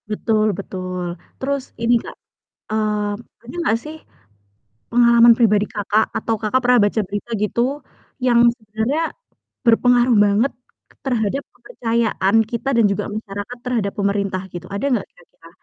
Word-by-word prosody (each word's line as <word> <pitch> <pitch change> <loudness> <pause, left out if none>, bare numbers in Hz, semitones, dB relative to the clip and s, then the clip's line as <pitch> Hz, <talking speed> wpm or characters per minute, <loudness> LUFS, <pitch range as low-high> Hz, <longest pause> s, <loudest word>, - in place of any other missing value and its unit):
Betul 215 0 +1
betul, 185 -2 -5 0.4
terus 275 0 -1 0.2
ini 235 +1 +3
Kak, - - -9 0.6
mmm, 210 -1 0 0.3
ada 245 +6 -10
nggak 230 -9 +2
sih 305 +1 -8 1.0
pengalaman 235 0 +6
pribadi 210 -3 +3
Kakak, 210 +1 +1
atau 225 +1 -1
Kakak 220 +4 +2
pernah 250 0 +5
baca 210 +2 +1
berita 205 +4 -5
gitu, 210 +3 0 0.6
yang 240 -2 +4 0.2
sebenarnya 220 +7 -2 0.6
berpengaruh 245 +1 +4
banget 210 +7 +2 0.5
terhadap 245 0 0
kepercayaan 225 - -1 0.2
kita 240 +3 -2
dan 230 - +5
juga 200 +1 -2
masyarakat 210 +2 -6
terhadap 230 -5 -1
pemerintah 200 -2 0
gitu, 175 0 -7
ada 200 +6 -2
nggak 230 -6 0
kira-kira? 170 -1 -20
220 Hz, 130 wpm, -20 LUFS, 205-240 Hz, 1.0 s, pengalaman